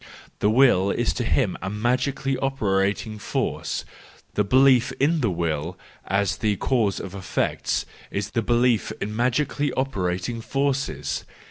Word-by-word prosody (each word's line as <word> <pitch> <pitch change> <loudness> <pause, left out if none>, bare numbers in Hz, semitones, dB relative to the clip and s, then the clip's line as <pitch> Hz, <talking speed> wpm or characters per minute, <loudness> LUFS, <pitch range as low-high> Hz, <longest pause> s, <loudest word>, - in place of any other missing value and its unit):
The 105 - +3
Will 110 -5 +5
is - - 0
to - - -2
him - - +1
a 95 - -3
magically 130 +5 0
operating 105 -4 0
force; - - -2 0.5
the 105 - +2
belief 130 +3 +5
in 155 +3 +1
the 115 - +2
Will 85 -1 -2 0.3
as 100 0 +1
the 105 -2 +1
cause 110 -2 +1
of 95 - -7
effects 95 -2 -1 0.2
is 100 0 -3
the 115 - 0
belief 120 -1 +2
in 105 +1 -4
magically 135 +4 +1
operating 105 -3 -2
forces. 135 +2 -1
115 Hz, 135 wpm, -24 LUFS, 100-130 Hz, 0.5 s, Will